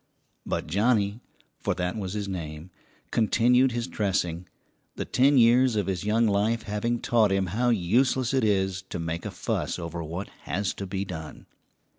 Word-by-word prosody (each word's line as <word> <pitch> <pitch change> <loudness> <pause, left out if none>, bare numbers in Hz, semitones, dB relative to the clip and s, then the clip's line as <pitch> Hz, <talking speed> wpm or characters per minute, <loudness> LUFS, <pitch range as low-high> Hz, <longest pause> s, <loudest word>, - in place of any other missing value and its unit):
] - - -45
But - - -2
Johnnie, 105 +3 +1 0.4
for - - -1
that 90 0 -2
was 95 -4 -4
his 105 -1 -3
name, 85 -2 -6 0.4
continued 125 +3 +3
his 120 0 -2
dressing, 90 -6 -1 0.5
the - - -4
ten 135 +2 +3
years 120 +1 +5
of 105 -3 +1
his 95 -1 -2
young 110 +3 +2
life 110 +2 +1
having 115 +3 -1
taught 110 -4 +3
him 95 -1 +2
how 120 +3 +2
useless 120 +5 +2
it 130 -2 +2
is 95 -3 +1
to - - -4
make 85 0 -3
a - - -4
fuss - - -2
over 85 -1 -5
what 85 +5 -5 0.2
has 95 +2 -1
to 100 - -6
be 95 +1 -3
done. 80 -4 -8
100 Hz, 175 wpm, -26 LUFS, 90-115 Hz, 0.5 s, years